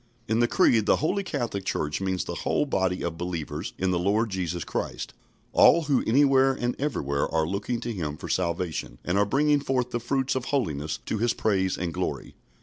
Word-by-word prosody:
In 110 +1 +1
the 120 - +4
Creed 110 -3 +3
the - - +5
Holy 190 +6 0
Catholic 120 - -3
Church 75 -2 -2
means 95 -1 -1
the - - -4
whole - - +1
body 95 -9 0
of 80 -1 -3
believers 85 -2 -4
in 95 0 0
the 90 - +1
Lord 105 +5 +1
Jesus 90 -3 -2
Christ, - - -4 0.4
all 170 - +6
who 140 -3 +1
anywhere 135 +2 +4
and 120 -1 -2
everywhere 70 - -1
are 80 -1 +2
looking 100 +7 -2
to 120 - -3
Him 75 -6 -4
for - - -7
salvation, 85 -2 -2
and 90 - 0
are 100 +1 +4
bringing 145 +6 +3
forth 130 -3 -1
the 120 - -1
fruits 130 +3 0
of 130 -1 -2
holiness 80 - -1
to 110 - -2
His 120 +1 +1
praise 95 -3 +1
and 85 -2 -3
glory. - - -3
100 Hz, 200 wpm, -26 LUFS, 90-130 Hz, 0.4 s, all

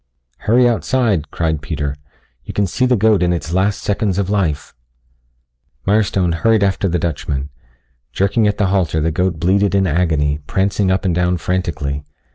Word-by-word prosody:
"Hurry 120 +3 +5
outside," 110 - 0
cried 80 -3 -1
Peter. 70 -2 -3 0.5
"You - - -8
can 100 - +2
see 125 +8 0
the 125 - +3
goat 110 -2 +3
in 90 -1 +2
its 85 -1 -3
last 95 +2 0
seconds 100 -2 0
of 100 -1 -1
life." 85 -9 -1 1.1
Mirestone 100 -3 +2
hurried 110 +5 +2
after 95 0 +1
the 90 - 0
Dutchman. 75 -4 -3 0.6
Jerking 100 +3 +1
at 105 - 0
the 105 - +1
halter 85 -5 +1
the 80 +2 0
goat 90 0 -1
bleated 100 +4 +2
in 95 -1 +3
agony, 75 -4 +1
prancing 95 0 0
up 95 +1 0
and 90 - +1
down 90 +1 +1
frantically. 80 -6 -2
95 Hz, 165 wpm, -18 LUFS, 80-100 Hz, 1.1 s, Hurry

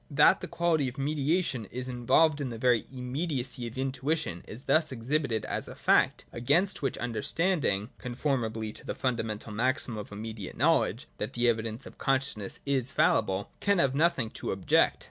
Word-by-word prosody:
That 150 0 +5
the - - -4
quality 165 -5 +1
of 125 - -6
mediation 145 - 0
is 125 +5 -5
involved 140 +5 +3
in 135 - -2
the 115 - -6
very 120 -2 +2
immediacy 130 -1 -2
of 115 - -9
intuition 135 - -1
is 120 +5 -8
thus 155 +3 +3
exhibited 130 -1 -1
as - - -3
a - - -8
fact, - - +2
against 175 +11 +2
which 135 -3 -1
understanding, 120 - 0
conformably 120 -4 -2
to - - -8
the - - -4
funda 125 -3 0
mental 110 0 -5
maxim 120 0 -1
of 105 - -8
immediate 105 -1 -7
knowledge - - +2
that - - -3
the 120 0 +1
evi 115 -2 +2
dence 115 +4 -5
of - - -12
consciousness 135 -7 -1
is 135 -3 +1
infallible, 100 -2 +1
can 200 -1 +2
have 140 -6 +3
nothing 140 -6 +2
to - - -5
object. - - +3
130 Hz, 175 wpm, -29 LUFS, 115-145 Hz, -, That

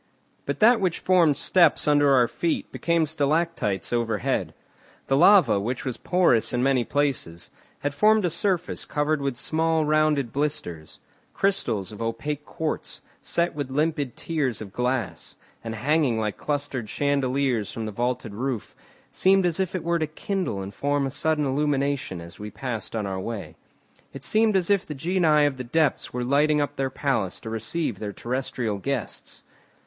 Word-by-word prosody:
But - - -2
that 230 +1 +6
which 180 -4 +1
formed 170 -6 +3
steps 170 -6 +3
under 145 -1 +4
our 125 -3 +5
feet 170 +6 -2
became 170 -1 +1
stalactites 150 - -1
overhead. 115 -4 -1 0.5
The 135 - +1
lava, 175 - +6
which 120 +5 -3
was 130 -3 -3
porous 170 -12 +2
in 125 0 +1
many 135 -2 +3
places, 130 - -2 0.3
had 145 0 -1
formed 215 +5 +4
a 175 - 0
surface 180 +1 0
covered 150 0 -1
with 140 -2 -1
small 160 +4 0
rounded 150 -4 +2
blisters; 135 - -3 0.4
crystals 120 - 0
of 105 - -9
opaque 145 +6 -3
quartz, 160 -1 -4 0.2
set 170 0 0
with 145 -3 -4
limpid 145 -2 -1
tears 145 -9 -1
of 100 -3 -8
glass, 125 0 -2 0.3
and 115 -1 -5
hanging 135 -1 +1
like 105 -2 -1
clustered 140 -6 -3
chandeliers 135 -5 0
from 115 - -5
the 110 - -4
vaulted 120 0 -2
roof, 120 0 -4 0.4
seemed 190 0 +3
as 175 0 0
it 185 -2 -1
were 170 0 +1
to 155 - 0
kindle 175 - -3
and 95 +1 -8
form 145 +4 0
a 135 - -3
sudden 155 +1 0
illumination 140 - 0
as 85 0 -11
we 105 0 -6
passed 115 -2 -5
on 110 -2 -1
our 95 -1 -3
way. 110 +1 -6 0.6
It - - -9
seemed 215 -1 +2
as 185 0 +2
if 200 -2 +3
the 150 - -7
genii 160 -1 +3
of 140 -2 0
the 125 - -4
depths 150 +3 0
were 125 0 -3
lighting 150 +4 +3
up 145 0 -1
their 135 -1 -1
palace 130 -9 -1
to 110 - -6
receive 115 - -2
their 105 -1 -5
terrestrial 120 -3 -3
guests. 135 +2 -5
140 Hz, 165 wpm, -25 LUFS, 120-160 Hz, 0.6 s, that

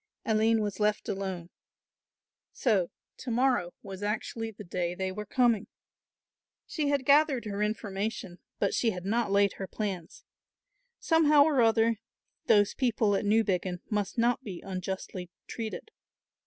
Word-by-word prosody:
Aline 220 0 +3
was 205 -1 -4
left 210 0 +1
alone. 190 -3 -4 1.0
So 200 -8 +1 0.3
to 255 - -7
morrow 240 -7 +1
was 195 0 -8
actually 220 +2 -3
the 210 -1 -10
day 175 -1 -2
they 190 0 -2
were 210 +2 -6
coming! 235 -4 +2 1.0
She 305 -4 -2
had 280 -2 0
gathered 280 -3 +4
her 205 -1 -3
information, 210 -3 -3 0.2
but 200 - 0
she 235 - +2
had 180 -4 -5
not 225 +2 0
laid 200 0 +3
her 195 - -5
plans. 190 -6 -5 0.8
Somehow 305 -3 +5
or 290 -4 +3
other 225 -1 +3 0.5
those 205 -1 +4
people 225 -5 +1
at 195 - -1
Newbiggin 190 -4 +1
must 205 0 -1
not 240 +2 +2
be 190 -7 -6
unjustly 185 -1 -5 0.2
treated. 230 - -6
210 Hz, 140 wpm, -29 LUFS, 195-235 Hz, 1.0 s, Somehow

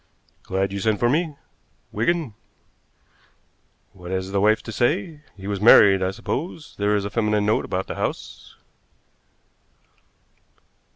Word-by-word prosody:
"Glad 95 +1 -2
you 100 - -3
sent 110 +1 +1
for 120 - +2
me, 155 +2 0 0.6
Wigan. 145 +3 -1 1.6
What 90 -2 -11
has 95 0 -3
the 100 0 0
wife 110 +1 +3
to 110 - -7
say? 120 +6 -1 0.2
He 95 - -11
was 100 -1 -3
married, 100 -3 +7
I 95 - +1
suppose? 150 - -5
There 105 +1 +2
is 100 -1 -1
a 100 - -5
feminine 105 -1 0
note 105 - +1
about 95 +1 -3
the - - -6
house." - - -6
105 Hz, 135 wpm, -23 LUFS, 95-120 Hz, 1.6 s, married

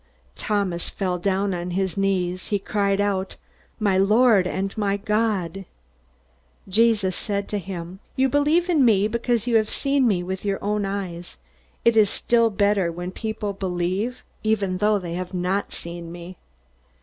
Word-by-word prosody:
Thomas 200 -5 -1
fell 180 -3 -2
down 195 +1 0
on 175 0 -3
his 190 -1 -1
knees. 185 -2 0
He 205 - +1
cried 200 0 0
out, 195 -2 -1 0.4
"My 200 -3 +2
Lord 210 -1 +5
and 195 +1 -3
my 200 -2 0
God!" 205 -3 -1 1.0
Jesus 205 -2 +2
said 200 -1 -2
to 205 - -1
him: 185 -1 -7 0.2
"You 265 +1 +3
believe 295 +6 +2
in 320 -6 +3
me 210 -4 +4
because 235 0 0
you 235 -2 +3
have 215 -1 +1
seen 275 -2 +1
me 185 -5 +1
with 190 +1 -4
your 200 -1 0
own 205 0 0
eyes. 180 -3 -5 0.5
It 235 -1 +5
is 215 -2 +5
still 230 +1 +2
better 200 -3 +2
when 175 +2 -5
people 215 0 -4
believe 190 +5 -2 0.2
even 200 -4 0
though 210 +1 +3
they 175 -3 -5
have 180 +1 -5
not 180 +3 -1
seen 170 0 -7
me." 175 +1 -9
200 Hz, 160 wpm, -23 LUFS, 185-215 Hz, 1.0 s, Lord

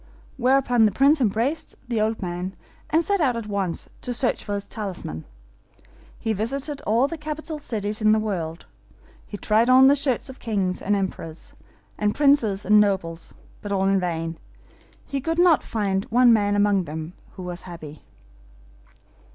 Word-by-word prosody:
Whereupon 250 -2 +3
the 210 - +3
Prince 280 +7 +4
embraced 235 +7 0
the 230 -3 0
old 220 -1 -1
man, 180 +2 -4 0.3
and 320 +2 +3
set 400 -3 +1
out 255 -6 +2
at 230 - -5
once 200 -4 -2
to 245 - -3
search 245 +1 0
for 205 - -3
his 200 - -5
talisman. 185 - -6 0.9
He 225 -1 -1
visited 275 +7 -3
all 235 +5 +3
the 330 +1 -6
capital 305 +1 -5
cities 215 -5 -3
in 215 0 +5
the 215 - +4
world. 175 -7 -3 0.6
He 205 - -7
tried 220 +4 +2
on 260 +1 +7
the 275 +1 +6
shirts 270 -3 -1
of 265 -1 -10
kings, 195 -5 -1
and 205 +1 +1
emperors, 175 -4 -5 0.5
and 210 0 +1
princes 275 -9 +3
and 210 +2 +6
nobles; 190 -5 -1 0.3
but 205 - -6
all 195 -1 +1
in 195 0 +3
vain: 165 -2 -3 0.7
he 275 -1 -3
could 325 +4 -2
not 350 -3 +5
find 195 -3 -2
a 250 +2 +4
man 210 -4 +4
among 205 -2 +2
them 160 +2 -6 0.2
that 185 - -6
was 180 0 -5
happy. 155 -3 -9
215 Hz, 170 wpm, -24 LUFS, 190-260 Hz, 0.9 s, on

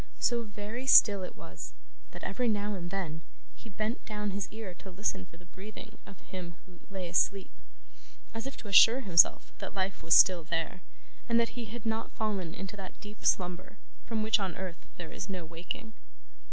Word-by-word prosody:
So 240 -1 +2
very 215 +4 -6
still 205 -6 +8
it 180 - -6
was, - - -9 0.4
that, - - -11
every 250 -1 -1
now 210 -1 0
and 175 -3 -5
then, 170 -5 -3 0.3
he 230 - -13
bent 215 +3 -3
down 210 -1 -3
his 195 0 -3
ear 215 -4 -7
to 195 - -10
listen 190 -1 -2
for 170 - -16
the 180 - -17
breathing 215 +4 -11
of 195 - -12
him 175 -2 -7
who 180 -2 -17
lay 190 -2 -4
asleep, 195 +2 +1 0.8
as 225 +3 -4
if 270 - -7
to - - -10
assure 225 +6 +7
himself 175 -8 +5
that - - -6
life 190 0 -1
was 165 +1 +5
still 180 -3 +7
there, 165 +3 -3 0.5
and 235 0 +4
that 230 - +2
he 240 -2 -6
had 230 +1 -8
not 225 0 -1
fallen 195 -6 -2
into 195 +2 -6
that 190 -2 -9
deep 210 0 -11
slumber 180 +2 0 0.3
from 220 -2 -2
which 220 0 +4
on 190 -4 -3
earth 185 -2 -7
there 170 -2 -7
is - - -6
no 185 -3 -4
waking. 170 +7 -6
195 Hz, 190 wpm, -31 LUFS, 180-220 Hz, 0.8 s, still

